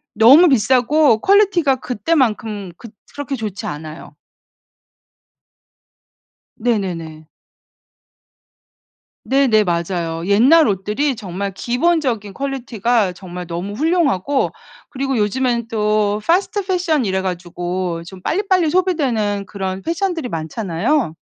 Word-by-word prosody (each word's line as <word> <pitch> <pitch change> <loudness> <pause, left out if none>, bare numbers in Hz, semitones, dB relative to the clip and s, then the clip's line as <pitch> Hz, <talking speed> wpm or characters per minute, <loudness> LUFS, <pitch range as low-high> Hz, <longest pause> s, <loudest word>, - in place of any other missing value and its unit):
너무 265 +11 +7
비싸고 260 +1 +3
퀄리티가 385 -9 +3
그때만큼 220 - -1
그 230 - -11 0.2
그렇게 285 -1 -4
좋지 215 -4 -5
않아요. 155 +2 -8 2.4
네네네. 170 -9 -3 2.0
네네 260 -6 +3
맞아요. 170 -1 -2
옛날 255 +11 +5
옷들이 210 +8 -1
정말 200 -2 -5
기본적인 245 - -1
퀄리티가 240 -6 -1
정말 180 -1 -8
너무 180 +4 -5
훌륭하고 285 - +1 0.4
그리고 270 -1 -2
요즘에는 235 +2 0
또 210 -2 0
패스트 385 +3 +1
패션 350 -7 0
이래 190 -1 0
가지고 175 -1 -4
좀 185 +1 -11
빨리빨리 370 - +1
소비되는 265 - 0
그런 190 -1 -5
패션들이 335 - -2
많잖아요. 180 - -1
225 Hz, 255 characters per minute, -18 LUFS, 190-285 Hz, 2.4 s, 너무